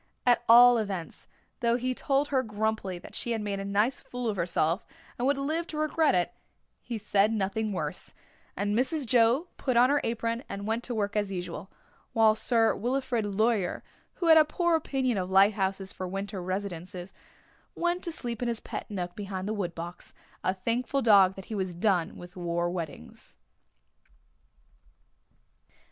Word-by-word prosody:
At 245 Hz, -1 st, +4 dB
all 240 Hz, +1 st, +8 dB
events, 195 Hz, -6 st, -5 dB, 0.3 s
though 235 Hz, -2 st, +2 dB
he 255 Hz, +1 st, -1 dB
told 275 Hz, +3 st, 0 dB
her 265 Hz, -2 st, +2 dB
grumpily 215 Hz, -4 st, -2 dB
that 175 Hz, -, -12 dB
she 235 Hz, -, -1 dB
had 225 Hz, -, -2 dB
made 200 Hz, -1 st, -3 dB
a -, -, -4 dB
nice 205 Hz, +6 st, +1 dB
fool 245 Hz, -1 st, -5 dB
of 210 Hz, -, -1 dB
herself, 170 Hz, 0 st, 0 dB, 0.3 s
and 245 Hz, -, -1 dB
would 280 Hz, 0 st, +2 dB
live 315 Hz, +5 st, -1 dB
to 305 Hz, -, -6 dB
regret 310 Hz, -, +2 dB
it, 180 Hz, +6 st, 0 dB, 0.5 s
he 235 Hz, -, -5 dB
said 205 Hz, 0 st, +2 dB
nothing 215 Hz, +1 st, -1 dB
worse, 190 Hz, -, -3 dB, 0.4 s
and 205 Hz, +1 st, 0 dB
Mrs. 270 Hz, +4 st, +1 dB
Joe 245 Hz, +8 st, +3 dB
put 255 Hz, -3 st, 0 dB
on 250 Hz, +3 st, +6 dB
her 290 Hz, -, +2 dB
apron 230 Hz, +1 st, -2 dB
and 200 Hz, 0 st, -5 dB
went 225 Hz, +2 st, -1 dB
to 245 Hz, -, -4 dB
work 205 Hz, -1 st, -1 dB
as 205 Hz, -2 st, 0 dB
usual, 180 Hz, 0 st, -5 dB, 0.4 s
while 220 Hz, -1 st, +5 dB
Sir 225 Hz, 0 st, +2 dB
Wilfrid 245 Hz, -1 st, -1 dB
Laurier, 215 Hz, -4 st, +1 dB, 0.3 s
who 350 Hz, -, -3 dB
had 320 Hz, -1 st, +8 dB
a -, -, +7 dB
poor 340 Hz, +2 st, +1 dB
opinion 265 Hz, -8 st, 0 dB
of 180 Hz, 0 st, -3 dB
lighthouses 195 Hz, 0 st, +2 dB
for 185 Hz, -, -5 dB
winter 195 Hz, +1 st, -4 dB
residences, 185 Hz, -1 st, -5 dB, 0.6 s
went 345 Hz, +1 st, -1 dB
to 340 Hz, -, -2 dB
sleep 240 Hz, -7 st, -4 dB
in 245 Hz, -, 0 dB
his 230 Hz, -2 st, -2 dB
pet -, -, -7 dB
nook 180 Hz, -4 st, -4 dB
behind 195 Hz, -2 st, -5 dB
the 215 Hz, -, -1 dB
woodbox, 175 Hz, -3 st, -5 dB, 0.3 s
a -, -, +2 dB
thankful 235 Hz, +8 st, -1 dB
dog 195 Hz, -4 st, +6 dB
that 195 Hz, -, -9 dB
he -, -, -7 dB
was 190 Hz, -4 st, -2 dB
done 180 Hz, -2 st, +1 dB
with 175 Hz, 0 st, -11 dB
war 175 Hz, -1 st, -1 dB
weddings. 160 Hz, -, -7 dB
215 Hz, 170 wpm, -28 LUFS, 190-245 Hz, 0.6 s, all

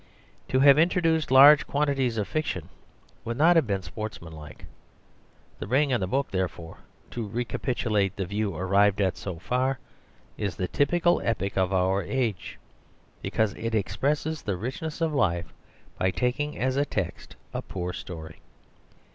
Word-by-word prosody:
To 130 Hz, -, +1 dB
have 140 Hz, +1 st, +7 dB
introduced 165 Hz, -2 st, +2 dB
large 140 Hz, +3 st, +8 dB
quantities 140 Hz, -5 st, 0 dB
of 105 Hz, -, -1 dB
fiction 95 Hz, -, -3 dB, 0.5 s
would 115 Hz, +1 st, -4 dB
not 165 Hz, +5 st, +5 dB
have 160 Hz, -7 st, +4 dB
been 100 Hz, -2 st, -1 dB
sportsmanlike. 85 Hz, -6 st, -8 dB, 0.9 s
The -, -, -5 dB
Ring 135 Hz, +4 st, +2 dB
and 120 Hz, -, +1 dB
the 95 Hz, -, -1 dB
Book 135 Hz, +8 st, -1 dB
therefore, 85 Hz, -3 st, -4 dB, 0.3 s
to 115 Hz, -3 st, -4 dB
re 120 Hz, +4 st, -2 dB
capitulate 110 Hz, -7 st, -1 dB
the 95 Hz, -, -2 dB
view 100 Hz, 0 st, -2 dB
arrived 100 Hz, +4 st, +2 dB
at 95 Hz, -2 st, +1 dB
so 90 Hz, -4 st, -6 dB
far, 130 Hz, +8 st, 0 dB, 0.6 s
is 100 Hz, -3 st, -2 dB
the 90 Hz, -, -2 dB
typical 175 Hz, -, +2 dB
epic 100 Hz, -4 st, -1 dB
of 95 Hz, -1 st, +1 dB
our 95 Hz, +1 st, +2 dB
age, 110 Hz, -3 st, -2 dB, 0.6 s
because 110 Hz, -2 st, 0 dB
it 115 Hz, 0 st, -3 dB
expresses 145 Hz, +8 st, -1 dB
the 100 Hz, -3 st, -2 dB
richness 140 Hz, -, -5 dB
of 160 Hz, -2 st, +1 dB
life 85 Hz, -, 0 dB, 0.5 s
by 95 Hz, -, +2 dB
taking 125 Hz, -, -1 dB
as 130 Hz, +1 st, 0 dB
a 140 Hz, -, +3 dB
text 95 Hz, -, -4 dB, 0.2 s
a -, -, -2 dB
poor 90 Hz, -1 st, -5 dB
story. 80 Hz, -3 st, -8 dB
110 Hz, 155 wpm, -26 LUFS, 95-140 Hz, 0.9 s, large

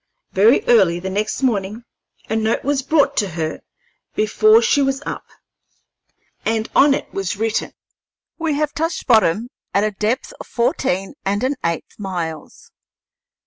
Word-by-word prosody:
Very 215 Hz, +7 st, +4 dB
early 190 Hz, -8 st, +4 dB
the 190 Hz, +1 st, -5 dB
next 215 Hz, +6 st, -2 dB
morning 215 Hz, -2 st, -1 dB, 0.4 s
a 220 Hz, -, -2 dB
note 220 Hz, +1 st, 0 dB
was 280 Hz, 0 st, 0 dB
brought 280 Hz, 0 st, +2 dB
to 205 Hz, -, +1 dB
her 160 Hz, -1 st, -3 dB, 0.5 s
before 430 Hz, -, +4 dB
she 285 Hz, -, +3 dB
was 270 Hz, +1 st, 0 dB
up, -, -, -5 dB, 1.2 s
and 220 Hz, 0 st, 0 dB
on 280 Hz, 0 st, +6 dB
it -, -, -7 dB
was 195 Hz, -1 st, -3 dB
written: 225 Hz, +1 st, -1 dB, 0.7 s
"We 320 Hz, -3 st, 0 dB
have 300 Hz, 0 st, -1 dB
touched 325 Hz, +1 st, -2 dB
bottom 220 Hz, -1 st, +3 dB, 0.3 s
at 200 Hz, -, +3 dB
a 215 Hz, -, +1 dB
depth 215 Hz, +5 st, -2 dB
of -, -, -9 dB
fourteen 195 Hz, -5 st, -1 dB
and 200 Hz, +4 st, -1 dB
an 265 Hz, +2 st, +1 dB
eighth 170 Hz, +4 st, -3 dB
miles." 170 Hz, -6 st, -6 dB
220 Hz, 145 wpm, -20 LUFS, 195-270 Hz, 1.2 s, on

